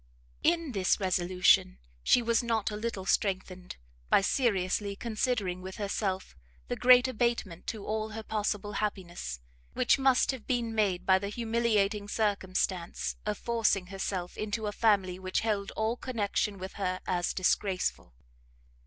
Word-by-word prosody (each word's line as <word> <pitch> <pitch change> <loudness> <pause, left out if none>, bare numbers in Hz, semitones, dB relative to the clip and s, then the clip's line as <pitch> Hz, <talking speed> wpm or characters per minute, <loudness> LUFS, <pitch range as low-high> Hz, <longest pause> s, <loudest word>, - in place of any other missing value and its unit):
In 330 -3 +2
this 195 -3 +1
resolution 180 - +3 0.2
she 245 - +4
was 230 0 +2
not 225 -3 0
a - - -4
little 210 -3 -4
strengthened, 185 -2 -1 0.3
by - - +5
seriously 200 -3 0
considering 215 -4 -1
with 190 +1 -7
herself 195 -2 -2 0.3
the - - -1
great 250 +1 +6
abatement 235 -8 -1
to 215 -3 -4
all 215 0 -2
her 220 +1 -6
possible 210 -1 -2
happiness, 175 - -4 0.3
which - - +3
must 265 0 +4
have 260 -4 -9
been 240 -3 0
made 200 -5 +1
by 190 0 +5
the 200 +1 -4
humiliating 220 -2 0
circumstance 190 -4 -1
of 210 -1 -1
forcing 220 -5 +1
herself 185 -2 -3
into 215 +1 -2
a 205 - -1
family 195 -5 +2
which 185 0 -1
held 205 -3 -1
all 220 +2 0
connection 210 -4 -1
with 190 +1 -7
her 185 -1 -1
as 175 -1 0
disgraceful. 185 - 0
205 Hz, 145 wpm, -30 LUFS, 185-225 Hz, 0.3 s, great